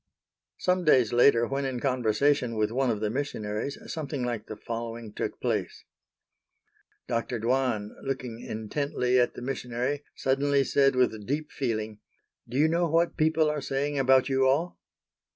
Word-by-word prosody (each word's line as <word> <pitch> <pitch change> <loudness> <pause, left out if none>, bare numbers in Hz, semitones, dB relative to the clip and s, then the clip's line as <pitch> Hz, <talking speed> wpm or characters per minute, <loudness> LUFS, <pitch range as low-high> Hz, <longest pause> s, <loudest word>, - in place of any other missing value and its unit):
Some 180 0 +1
days 130 -8 +4
later 120 -1 +5
when 135 +2 -2
in 130 -2 -2
conversation 125 0 +1
with 110 0 0
one 130 +1 +1
of 110 -3 -1
the 105 -1 0
missionaries 115 -2 -3 0.2
something 145 -4 -3
like 120 -3 -3
the 110 - -6
following 115 -1 -6
took - - -4
place: - - -2 1.2
Dr. 120 0 -1
Dwan, 115 -3 0
looking 125 -4 -4
intently 125 +3 -1
at 120 - +1
the - - -7
missionary, 125 +2 -2
suddenly 140 +1 +2
said 135 -1 +3
with 110 -5 +1
deep 150 +3 -2
feeling, 110 -5 -3 0.5
"Do 125 - -3
you 150 +2 +5
know 170 +1 +1
what 165 +2 +2
people 155 0 +2
are 150 -1 -1
saying 140 +2 -1
about 130 -1 +4
you 135 -1 +2
all?" 155 +7 0
130 Hz, 150 wpm, -27 LUFS, 115-140 Hz, 1.2 s, later